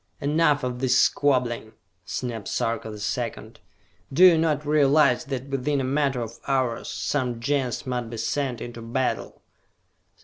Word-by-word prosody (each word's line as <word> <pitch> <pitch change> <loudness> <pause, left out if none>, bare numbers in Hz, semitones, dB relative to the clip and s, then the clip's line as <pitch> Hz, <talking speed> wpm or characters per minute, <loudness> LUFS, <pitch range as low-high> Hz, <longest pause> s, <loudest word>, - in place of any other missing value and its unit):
"Enough 150 0 +2
of 125 -1 -3
this 130 0 +3
squabbling," 125 -7 +1 0.3
snapped 115 -1 -4
Sarka 115 -1 -2
the 105 - -7
Second. 105 0 -4 0.5
"Do 170 +7 +6
you 180 -2 +8
not 155 -2 +1
realize 145 -1 +4
that 135 -1 -5
within 140 +1 0
a - - -1
matter 135 -1 0
of 115 0 -9
hours, 130 -4 0
some 125 -5 -2
Gens 130 0 -1
must 125 -3 -3
be 115 - -6
sent 125 +1 -2
into 120 -1 -7
battle? 120 +3 -3
130 Hz, 145 wpm, -25 LUFS, 120-145 Hz, 0.5 s, you